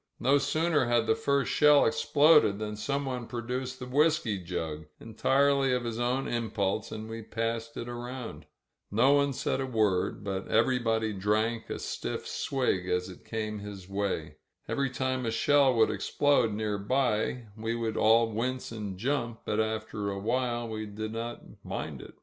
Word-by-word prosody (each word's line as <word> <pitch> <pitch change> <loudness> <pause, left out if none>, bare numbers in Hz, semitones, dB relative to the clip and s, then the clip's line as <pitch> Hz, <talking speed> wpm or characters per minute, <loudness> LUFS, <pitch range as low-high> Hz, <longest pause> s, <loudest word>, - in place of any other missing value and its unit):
No 135 +4 +4
sooner 155 0 +1
had 120 -1 +2
the 110 - +3
first 140 +4 0
shell 150 -1 +6
ex - - 0
ploded 145 -9 +5
than 105 0 -4
someone 125 +2 -3
produced 125 +2 -4
the 125 - -7
whisky 140 -6 +2
jug, 80 -3 -4
entirely 135 +4 +2
of 125 -1 0
his 115 -1 -3
own 125 +3 0
impulse, 110 -3 -1
and 110 0 -6
we 115 0 -6
passed 115 +1 -3
it 120 - -5
around. 120 0 -7 0.4
No 120 +7 +4
one 140 0 +3
said 135 - -1
a 135 - -2
word, 105 -6 +1
but 95 -1 -3
everybody 115 -2 +2
drank 110 +4 0
a - - -3
stiff - - -4
swig 110 -9 -1
as 90 +1 0
it 90 - -12
came 110 -1 -4
his 100 -3 -8
way. 100 0 -3 0.3
Every 140 -1 0
time 130 0 -1
a 115 - 0
shell 135 +3 +4
would 110 -1 +4
explode 145 -6 +2
nearby 110 +3 0
we 110 +1 -2
would 115 -2 -2
all 115 +1 +4
wince 125 +4 -2
and 105 -4 -5
jump, 120 0 -2
but 105 - -1
after 110 -1 -2
a 100 - -3
while 120 +2 -1
we 110 -1 -5
did 110 +1 -5
not 115 +1 -5 0.2
mind - - -5
it. - - -12
115 Hz, 165 wpm, -29 LUFS, 110-130 Hz, 0.4 s, shell